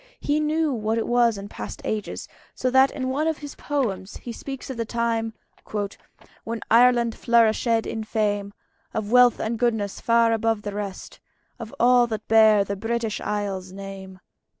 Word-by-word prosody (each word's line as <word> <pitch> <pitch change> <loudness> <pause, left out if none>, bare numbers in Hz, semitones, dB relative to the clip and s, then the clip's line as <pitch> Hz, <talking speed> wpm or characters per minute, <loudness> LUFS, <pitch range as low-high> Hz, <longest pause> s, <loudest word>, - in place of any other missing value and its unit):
He 295 +1 0
knew 305 -1 +1
what 220 -1 -1
it 225 - 0
was 240 -3 +3
in 200 0 -7
past - - -7
ages; 215 -2 -3 0.3
so 255 - -1
that 265 +1 +6
in 260 -1 -4
one 295 +4 0
of 320 -2 0
his 290 -2 -8
poems 225 -10 -3
he 240 - -8
speaks 270 +3 -7
of 255 - -7
the 230 - 0
time 225 -1 -1 1.1
"When 230 0 -4
Ireland 235 0 +5
flourishèd 230 0 +2
in 220 - -4
fame 205 -2 -1 0.4
Of 215 -1 -3
wealth 250 -1 +6
and 225 +1 -2
goodnesse, 225 -5 0
far 230 0 +3
above 225 -1 0
the 205 - -4
rest 200 -2 -6 0.4
Of 230 -1 -7
all 245 0 +5
that 220 -2 -5
beare 220 -2 +6
the 200 +1 -4
British 225 +1 -2
Islands 195 -3 -3
name." 190 -1 -9
225 Hz, 170 wpm, -24 LUFS, 210-245 Hz, 1.1 s, that